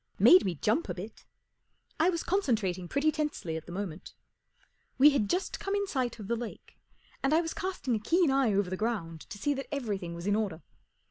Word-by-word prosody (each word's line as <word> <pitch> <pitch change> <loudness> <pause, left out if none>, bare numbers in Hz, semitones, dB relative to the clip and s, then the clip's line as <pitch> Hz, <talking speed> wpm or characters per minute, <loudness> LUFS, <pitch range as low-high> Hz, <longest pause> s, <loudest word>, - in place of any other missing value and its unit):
Made 365 - +8
me 180 -3 -1
jump 220 - 0
a - - -2
bit. 195 +5 -9 0.7
I 330 +3 +5
was 335 -2 -1
concentrating 215 - 0
pretty 285 - +2
tensely 300 - -3
at 160 - -6
the - - -8
moment. 185 -2 -6 0.8
We 290 +3 +8
had 240 -8 0
just 365 +2 -1
come 395 +1 -2
in 405 0 0
sight 255 - -2
of 210 -3 -8
the 235 - +1
lake, 235 -1 -8 0.4
and 275 +3 +2
I 330 - +4
was 325 -1 -4
casting 365 -9 -2
a - - -1
keen 330 - +3
eye 270 -4 +3
over 195 -2 +1
the - - 0
ground 185 -8 -2
to 205 - -7
see 290 +8 0
that 275 0 -5
everything 205 -11 -3
was 170 +1 -7
in 205 0 +2
order. 195 -7 -2
235 Hz, 210 wpm, -30 LUFS, 190-300 Hz, 0.8 s, Made